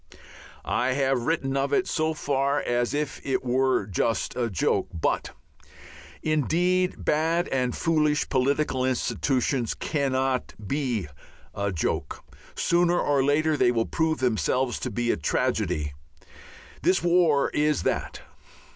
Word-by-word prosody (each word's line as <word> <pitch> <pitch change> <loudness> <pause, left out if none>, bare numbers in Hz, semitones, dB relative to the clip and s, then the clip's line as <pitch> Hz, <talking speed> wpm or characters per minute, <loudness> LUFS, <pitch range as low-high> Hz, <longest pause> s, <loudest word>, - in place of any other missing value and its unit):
I 125 +2 +1
have 135 -2 0
written 140 -5 0
of 140 0 0
it 185 - +2
so 155 -1 0
far 140 -1 0
as 120 -2 0
if 150 -1 -3
it 130 -2 -1
were 130 -3 +1
just 105 +4 -1
a 120 -2 -1
joke. 90 -7 0
But 80 - -1 0.9
indeed 175 +5 +1
bad 165 +3 +1
and 125 -2 -1
foolish 155 -3 +1
political 135 0 +1
institutions 130 -1 0
cannot 135 -3 -1
be 125 - -1 0.5
a 100 0 -2
joke. 85 - -3 0.3
Sooner 175 0 +2
or 140 -2 +2
later 155 +3 +2
they 120 - +3
prove 160 +7 0
themselves 125 +2 0
to 125 - -3
be 120 +1 0
tragedy. 90 - -1 0.9
This 185 -2 +2
war 170 -5 +3
is 150 -1 +1
that. - - -2
135 Hz, 120 wpm, -26 LUFS, 125-155 Hz, 0.9 s, they